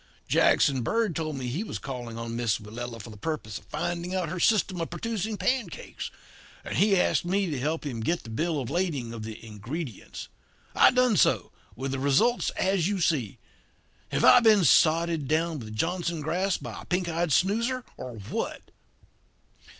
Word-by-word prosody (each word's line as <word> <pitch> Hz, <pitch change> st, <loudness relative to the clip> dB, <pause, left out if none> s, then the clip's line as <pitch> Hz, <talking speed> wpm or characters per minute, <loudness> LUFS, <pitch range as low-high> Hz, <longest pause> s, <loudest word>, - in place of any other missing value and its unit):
Jackson 135 Hz, -3 st, +3 dB
Bird 215 Hz, -, 0 dB
told 155 Hz, -2 st, -2 dB
me 130 Hz, -2 st, -4 dB
he 135 Hz, -, -2 dB
was -, -, -5 dB
calling 120 Hz, -4 st, -6 dB
on 115 Hz, 0 st, -5 dB
Miss 115 Hz, -3 st, +1 dB
Willella 115 Hz, +2 st, -7 dB
for 115 Hz, +1 st, -9 dB
the 105 Hz, -, -11 dB
purpose 110 Hz, -5 st, -4 dB
of -, -, -23 dB
finding 175 Hz, -, -3 dB
out 180 Hz, -4 st, -1 dB
her 180 Hz, +2 st, -4 dB
system 190 Hz, -2 st, +2 dB
of 165 Hz, -, -3 dB
producing 215 Hz, +3 st, -3 dB
pancakes, 255 Hz, +2 st, -2 dB, 0.6 s
and -, -, -3 dB
he 200 Hz, -2 st, +4 dB
asked -, -, +2 dB
me 195 Hz, +3 st, +1 dB
to 140 Hz, -, -2 dB
help 155 Hz, +4 st, -2 dB
him 125 Hz, -5 st, -4 dB
get 170 Hz, +10 st, -1 dB
the 115 Hz, -, -9 dB
bill 160 Hz, +6 st, -1 dB
of 130 Hz, -1 st, -4 dB
lading 150 Hz, -9 st, -1 dB
of 115 Hz, -, -6 dB
the 110 Hz, +1 st, -8 dB
ingredients. 115 Hz, -, -7 dB, 0.5 s
I -, -, +7 dB
done 250 Hz, -4 st, +3 dB
so, -, -, +3 dB, 0.2 s
with 130 Hz, +2 st, -4 dB
the 135 Hz, -, -2 dB
results 140 Hz, -, +2 dB
as 185 Hz, -3 st, +2 dB
you 200 Hz, -1 st, -1 dB
see. 140 Hz, -, 0 dB, 0.7 s
Have -, -, -1 dB
I -, -, +9 dB
been 220 Hz, -5 st, +5 dB
sodded 160 Hz, 0 st, +4 dB
down 160 Hz, +1 st, 0 dB
with 110 Hz, -2 st, -8 dB
Johnson 170 Hz, +4 st, -1 dB
grass 180 Hz, +5 st, 0 dB
by -, -, -8 dB
a -, -, -13 dB
pink 180 Hz, -1 st, -1 dB
eyed 170 Hz, 0 st, -1 dB
snoozer, 230 Hz, -, +1 dB
or 125 Hz, -1 st, -7 dB
what?' 100 Hz, -1 st, -5 dB
160 Hz, 180 wpm, -27 LUFS, 120-185 Hz, 0.7 s, I